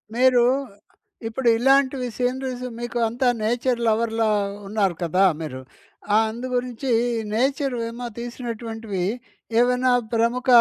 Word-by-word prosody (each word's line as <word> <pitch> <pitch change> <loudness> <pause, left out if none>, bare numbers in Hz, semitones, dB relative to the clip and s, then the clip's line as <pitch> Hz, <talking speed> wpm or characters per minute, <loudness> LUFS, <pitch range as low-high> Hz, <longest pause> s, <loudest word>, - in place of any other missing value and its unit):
మీరు 250 -1 +5 0.8
ఇప్పుడు 240 +3 -2
ఇలాంటివి 270 +1 +3
సీనరీస్ 255 0 -2
మీకు 240 0 -4
అంతా 245 +3 0 0.2
నేచర్ 240 +2 0
లవర్‌లా 225 0 +1 0.4
ఉన్నారు 195 -3 0
కదా 180 +3 +2 0.2
మీరు. 130 -5 -6 0.5
ఆ! - - +7
అందుగురించి 250 +1 -3 0.4
నేచర్ 270 +3 0
ఏమో 240 +1 -7
తీసినటువంటివి 230 -4 -5 0.6
ఏవైనా 250 +1 +3 0.2
ప్రముఖ 235 +3 +1
240 Hz, 100 wpm, -23 LUFS, 225-255 Hz, 0.8 s, ఆ